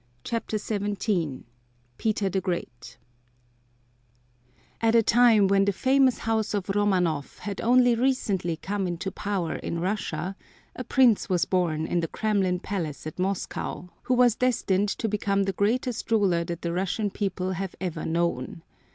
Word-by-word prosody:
CHAPTER 230 -2 -2
XVII 200 - -2 0.6
PETER 215 -2 0
THE 190 +1 -1
GREAT 175 -10 -5 1.8
At 225 0 +3
a 230 - +6
time 230 -2 +5
when 195 0 +3
the 200 - +2
famous 260 +4 +3
House 220 -2 -1
of 195 -2 -3
Romanoff 185 -7 0
had 200 -2 -5
only 245 +1 +5
recently 220 -9 0
come 195 +3 -2
into 175 +2 -3
power 195 -6 -2
in 170 - -4
Russia, 185 -1 -2 0.4
a 255 - -5
prince 245 -3 +3
was 180 -3 +2
born 165 -4 0
in 175 - 0
the 165 - -1
Kremlin 190 -3 0
Palace 165 -8 -4
at 155 - -7
Moscow 185 -1 -3
who 255 - +1
was 245 -2 +4
destined 205 -5 +1
to 225 - -2
become 200 -1 0
the 195 0 -1
greatest 230 +5 -1
ruler 195 -7 +2
that 170 -1 -6
the 170 -1 -1
Russian 195 +3 -1
people 185 -2 -2
have 190 0 -4
ever 180 -3 -4
known. 165 -3 -2
195 Hz, 150 wpm, -26 LUFS, 175-220 Hz, 1.8 s, a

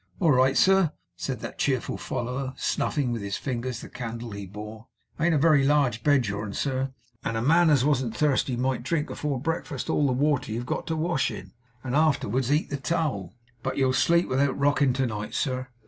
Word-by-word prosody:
'All 165 -5 +4
right, 130 0 +4
sir,' 190 -4 +4 0.2
said - - -4
that - - -7
cheerful - - 0
follower, 130 +2 -4
snuffing 140 -5 0
with 115 -2 -3
his 100 0 -3
fingers 125 -2 -3
the - - -8
candle 115 -1 -6
he 100 -1 -6
bore. 105 +3 -9 0.3
'It 165 - +2
ain't 170 -2 +3
a - - +4
very 150 -1 +4
large 135 -5 +2
bed, 145 -4 +4
your'n, 100 0 -4
sir; 135 +1 -1 0.3
and 115 - -2
a - - -1
man 165 +5 +5
as 140 -4 +4
wasn't 130 -6 0
thirsty 135 -4 +1
might 130 0 0
drink, 150 +4 -1
afore 145 -3 -2
breakfast, 145 -2 -3
all 145 - +2
the 130 - +1
water 140 -2 +1
you've 120 +3 -3
got - - -3
to 160 - -1
wash 160 -2 0
in, - - -9 0.3
and 130 0 -2
afterwards 135 -4 +2
eat 150 +2 +1
the 145 - -1
towel. 135 - -2 0.3
But - - -3
you'll 130 -2 +2
sleep 170 +6 +3
without 135 +1 +1
rocking 140 -2 +3
to 135 +1 0
night, 105 -3 -4
sir. 130 -1 -1
130 Hz, 205 wpm, -26 LUFS, 120-150 Hz, 0.3 s, man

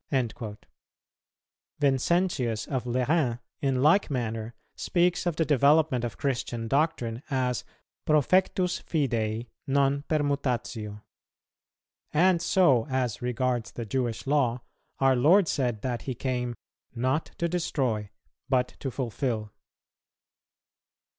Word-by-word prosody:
"[201:2] 115 -5 -2 1.2
Vincentius 135 - +1
of 130 -3 -2
Lerins, 125 +1 +1 0.2
in 135 -2 +1
like 165 +6 +4
manner, 115 -3 -3 0.2
speaks 180 0 +1
of 170 - 0
the 160 - +1
development 145 -2 +3
of 120 - -4
Christian 120 -4 -2
doctrine, 130 -4 0
as 125 -3 0 0.4
profectus 180 +4 +2
fidei 115 -7 -1 0.2
non 140 0 +2
permutatio.[201:3] 125 -8 -1 1.1
And 175 +2 +4
so 160 -10 +3
as 130 -4 -1
regards 125 -2 -1
the 120 - -5
Jewish 120 0 -2
Law, 130 -4 +1 0.3
our 135 -1 +4
Lord 165 +9 +5
said 120 -8 -1
that 125 -2 -2
He 130 - -4
came 125 -1 -2 0.4
"not 130 +6 0
to 170 -3 0
destroy, 130 - -1 0.4
but 125 -2 +2
to 135 - -3
fulfil." 115 -4 -3
130 Hz, 110 wpm, -27 LUFS, 120-150 Hz, 1.2 s, Lord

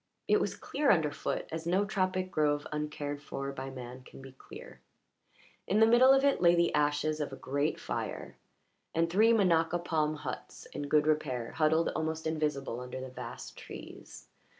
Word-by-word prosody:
It - - +4
was - - -1
clear 290 -1 -1
under 160 -5 +4
foot, - - -3
as 160 +1 -4
no 190 +4 +2
tropic 185 -2 -1
grove 145 -3 +1
uncared 150 -1 -4
for 140 -1 -5
by 135 0 -6
man 125 -1 -8
can - - -14
be 135 0 -11
clear; 65 - -12 0.9
in 205 - +2
the 220 - +8
middle 240 +3 +6
of 270 0 +5
it 280 -9 +3
lay 175 -1 +6
the 170 0 +2
ashes 150 +1 +1
of 145 -2 -3
a - - -6
great 140 +3 -1
fire, - - -5 0.6
and 165 0 +1
three 220 +5 +5
minaca 175 -6 +3
palm 155 -3 0
huts 150 - -7
in 145 - -4
good 150 0 +3
repair 140 -6 0
huddled 160 +1 +2
almost 160 0 -3
invisible 150 -6 -1
under 125 +1 -6
the 130 0 -6
vast 130 - -8
trees. - - -11
155 Hz, 175 wpm, -31 LUFS, 145-175 Hz, 0.9 s, the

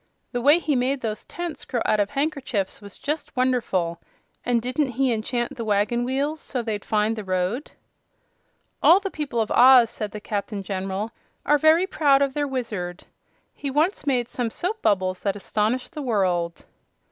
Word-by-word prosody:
"The 245 - -2
way 290 +6 +6
he 315 -4 0
made 260 +2 0
those 215 -2 -4
tents 345 -2 -6
grow 240 - -2
out 215 - +2
of 205 - +1
handkerchiefs 275 -10 -2
was 200 -1 -12
just 300 +1 -4
wonderful! 210 -10 0 0.4
And 245 -1 +2
didn't 255 +3 -1
he 260 0 +2
enchant 240 +4 -2
the 235 - -4
wagon 215 +3 +1
wheels 280 +5 -1
so 250 -3 -3
they'd 215 -3 -3
find 215 +1 +1
the 215 - -5
road?" 185 +8 -2 1.1
"All 350 +4 +7
the 390 -1 -4
people 290 -6 -3
of 220 - 0
Oz," 250 -2 +7
said 215 - -3
the 210 - -7
Captain 205 -1 -4
General, 195 +3 -3 0.3
"are 295 0 +4
very 315 +4 +5
proud 285 -6 +3
of 275 -1 -1
their 290 0 -1
Wizard. 210 -9 -4 0.5
He 280 - -5
once 305 +5 0
made 250 -4 +1
some 245 -2 -2
soap 385 - -3
bubbles 185 -2 +1
that 200 -1 -1
astonished 215 - -1
the 305 - -5
world." 185 -9 0
240 Hz, 175 wpm, -24 LUFS, 205-280 Hz, 1.1 s, All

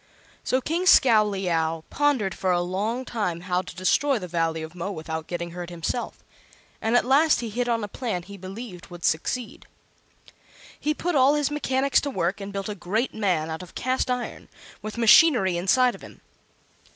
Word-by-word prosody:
So 260 - +1
King 340 +7 -1
Scowleyow 190 - +3
pondered 270 -10 +1
for 185 - -2
a 175 -1 +3
long 210 +8 -2
time 195 -9 -2
how 180 0 0
to 180 - -11
destroy 260 +9 +2
the 185 -4 -6
Valley 165 -2 -1
of 160 +1 -8
Mo 180 +3 -4
without 160 -2 -5
getting 170 -1 -4
hurt 175 0 -7
himself; 175 +8 -4 0.6
and 225 +2 +1
at - - +2
last 290 +4 +4
he 230 -2 -5
hit 245 +3 -1
on 230 -2 0
a - - -3
plan 205 -5 -4
he 200 +3 -11
believed 190 0 -9
would 175 -2 -8
succeed. 220 +9 -2 1.1
He 300 +1 -1
put 355 +3 -2
all 275 0 +5
his 295 -1 0
mechanics 275 -2 +1
to 285 - -3
work 190 -4 -2
and 200 0 -6
built 195 -1 -4
a 210 - -3
great 210 +6 -2
man 180 -7 0
out 160 - -5
of 180 - -12
cast 255 +1 -1
iron, 250 -1 -3 0.3
with 215 +2 -7
machinery 230 - +6
inside 240 +8 +3
of - - -12
him. - - -13
205 Hz, 185 wpm, -25 LUFS, 175-255 Hz, 1.1 s, machinery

